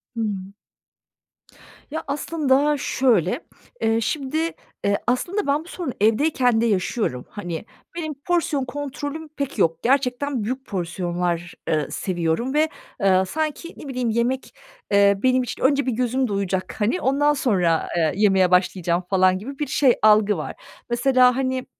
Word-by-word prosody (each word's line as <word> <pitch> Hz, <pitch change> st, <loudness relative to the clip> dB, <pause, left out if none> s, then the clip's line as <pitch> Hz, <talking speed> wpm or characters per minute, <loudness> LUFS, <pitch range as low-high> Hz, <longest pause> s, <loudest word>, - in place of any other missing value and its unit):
Hıı. 220 Hz, -2 st, -1 dB, 1.6 s
Ya, 320 Hz, -, -3 dB
aslında 290 Hz, 0 st, +1 dB
şöyle, 235 Hz, -, +1 dB, 0.4 s
eee, 225 Hz, +1 st, +2 dB
şimdi, 280 Hz, +4 st, -2 dB, 0.5 s
eee, 200 Hz, 0 st, +2 dB
aslında 355 Hz, +11 st, 0 dB
ben 290 Hz, +3 st, +1 dB
bu -, -, -17 dB
sorunu 340 Hz, -8 st, -5 dB
evdeyken 245 Hz, +1 st, +3 dB
de 235 Hz, -, +2 dB
yaşıyorum. 185 Hz, -, -1 dB
Hani, 175 Hz, -2 st, -6 dB, 0.3 s
benim 315 Hz, -3 st, -3 dB
porsiyon 300 Hz, -2 st, -1 dB
kontrolüm 290 Hz, +3 st, -5 dB
pek 280 Hz, -5 st, -5 dB
yok. 165 Hz, -4 st, +1 dB
Gerçekten 260 Hz, -1 st, +1 dB
büyük 260 Hz, +4 st, -4 dB
porsiyonlar, 175 Hz, -1 st, -2 dB, 0.2 s
ııı, 155 Hz, -2 st, 0 dB
seviyorum 180 Hz, +7 st, -1 dB
ve, 310 Hz, +1 st, +3 dB, 0.3 s
ııı, 190 Hz, -1 st, +4 dB
sanki 315 Hz, -, -3 dB
ne 290 Hz, -, -9 dB
bileyim, 250 Hz, -3 st, -2 dB
yemek, 240 Hz, +4 st, -1 dB, 0.4 s
eee, 200 Hz, 0 st, +5 dB
benim 255 Hz, 0 st, +3 dB
için -, -, -6 dB
önce 280 Hz, +1 st, +3 dB
bir 255 Hz, -, 0 dB
gözüm 250 Hz, +2 st, 0 dB
doyacak, 190 Hz, -3 st, -2 dB
hani, 230 Hz, +13 st, +1 dB
ondan 290 Hz, +2 st, +3 dB
sonra, 185 Hz, -, +1 dB
eee, 160 Hz, -2 st, +2 dB
yemeye 190 Hz, -3 st, +3 dB
başlayacağım 180 Hz, -1 st, +2 dB
falan 185 Hz, -1 st, +4 dB
gibi 275 Hz, +8 st, -8 dB
bir 295 Hz, -, -1 dB
şey, 260 Hz, -4 st, +4 dB
algı 210 Hz, -2 st, +5 dB
var. 155 Hz, -, -5 dB, 0.3 s
Mesela, 250 Hz, +1 st, +4 dB
hani 260 Hz, -1 st, -1 dB
245 Hz, 145 wpm, -23 LUFS, 190-280 Hz, 1.6 s, eee